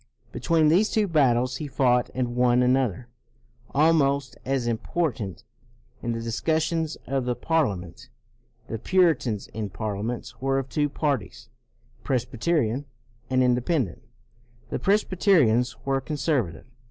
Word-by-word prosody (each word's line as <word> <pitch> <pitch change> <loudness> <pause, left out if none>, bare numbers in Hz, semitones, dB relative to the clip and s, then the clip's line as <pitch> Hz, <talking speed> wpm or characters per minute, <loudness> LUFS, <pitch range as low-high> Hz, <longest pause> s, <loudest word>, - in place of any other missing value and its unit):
Between 160 -2 +2
these 190 +7 +4
two 215 -2 +1
battles 130 -6 +2
he 150 - -5
fought 125 -3 +2
and 125 -2 -2
won 125 0 +3
another, 125 -4 +1 0.6
almost 140 -3 +2
as 135 -2 0
important, 120 - -2 0.6
in 120 - -2
the 115 - -3
discussions 160 +7 -1
of 135 -1 -1
the 125 -1 0
Parliament. 115 - -2 0.6
The 115 - -4
Puritans 160 - +2
in 110 -2 -5
Parliament 110 +3 -4
were 135 0 +1
of 135 -1 -3
two 145 0 0
parties, 130 -6 -3 0.5
Presbyterian 130 +1 0 0.4
and 130 0 +3
Independent. 125 - 0 0.7
The - - -2
Presbyterians 175 - +3
were 135 0 +1
conservative. 140 - -2
130 Hz, 115 wpm, -25 LUFS, 120-155 Hz, 0.7 s, these